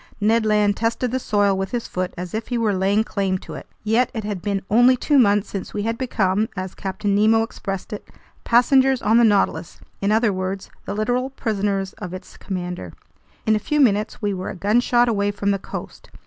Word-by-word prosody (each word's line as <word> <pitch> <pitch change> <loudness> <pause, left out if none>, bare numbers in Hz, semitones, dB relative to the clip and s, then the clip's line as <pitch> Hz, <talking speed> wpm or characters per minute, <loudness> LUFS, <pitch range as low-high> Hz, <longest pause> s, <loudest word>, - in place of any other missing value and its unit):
Ned 220 +1 +2
Land 210 -1 +3
tested 230 +2 -1
the 260 - 0
soil 205 -4 +2
with 190 0 -2
his 240 -2 -3
foot, 185 0 -3
as 180 0 -6
if 220 +1 -3
he 245 - -1
were 220 -3 +1
laying 195 +3 +2
claim 195 -3 -1
to 160 - -10
it. 140 - -9 0.2
Yet 225 +3 +2
it 220 - -3
had 205 -3 -4
been 195 0 -2
only 245 +4 +5
two 285 +3 +3
months 205 -4 +3
since 195 - -6
we 205 - -1
had 230 +1 -2
become, 215 -4 0
as 185 0 -4
Captain 200 +1 -3
Nemo 220 +2 +4
expressed 195 -3 -6
it, 210 - -7 0.4
"passengers 260 +2 +4
on 220 +3 +4
the - - +5
Nautilus," 205 -6 +1 0.2
in 200 +1 +1
other 220 -1 +3
words, 185 +1 -4
the 200 - -4
literal 245 +5 0
prisoners 200 -6 -2
of 185 -4 -6
its 185 0 -11
commander. 180 - -5 0.5
In 220 - +3
a - - +1
few 300 +7 -1
minutes 215 -3 +2
we 205 -1 0
were 185 0 -4
a - - -6
gunshot 240 +5 +2
away 205 -3 +1
from 200 0 -1
the 195 - 0
coast. - - -8
210 Hz, 210 wpm, -22 LUFS, 195-230 Hz, 0.5 s, only